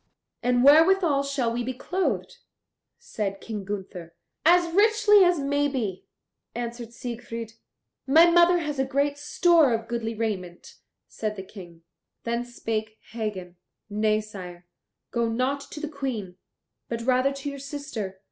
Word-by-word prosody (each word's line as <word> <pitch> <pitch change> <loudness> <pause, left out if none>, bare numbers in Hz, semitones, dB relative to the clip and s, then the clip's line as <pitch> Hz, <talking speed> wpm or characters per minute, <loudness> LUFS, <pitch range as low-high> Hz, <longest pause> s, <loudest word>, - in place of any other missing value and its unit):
"And 245 0 +2
wherewithal 320 +1 +5
shall 275 -4 -1
we 240 +1 -2
be 255 +1 -4
clothed?" 360 +8 -2 0.6
said 195 -2 -4
King 215 -3 -6
Gunther. 190 -4 -7 0.3
"As 345 +1 +4
richly 420 0 +5
as 355 -1 +3
maybe," 275 -8 -1 0.5
answered 235 -1 -5
Siegfried. 230 -2 -6 0.5
"My 320 +5 +7
mother 345 +1 +6
has 300 -4 -3
a - - +3
great 280 +2 0
store 320 -1 +4
of 225 0 -5
goodly 230 -1 -3
raiment," 190 -6 -4 0.3
said 215 -1 -4
the 190 - -7
King. 175 -4 -13 0.4
Then 235 +1 -1
spake 220 -2 -4
Hagen, 200 -6 -5 0.3
"Nay, 215 +1 +1
sire, 180 -4 -10 0.5
go 235 -1 0
not 255 +5 -1
to 300 - -8
the 305 - -4
Queen, 255 -11 -5 0.5
but 230 0 -3
rather 255 +2 +2
to 275 +1 -5
your 280 - -8
sister. 270 -9 -6
240 Hz, 140 wpm, -26 LUFS, 215-285 Hz, 0.6 s, My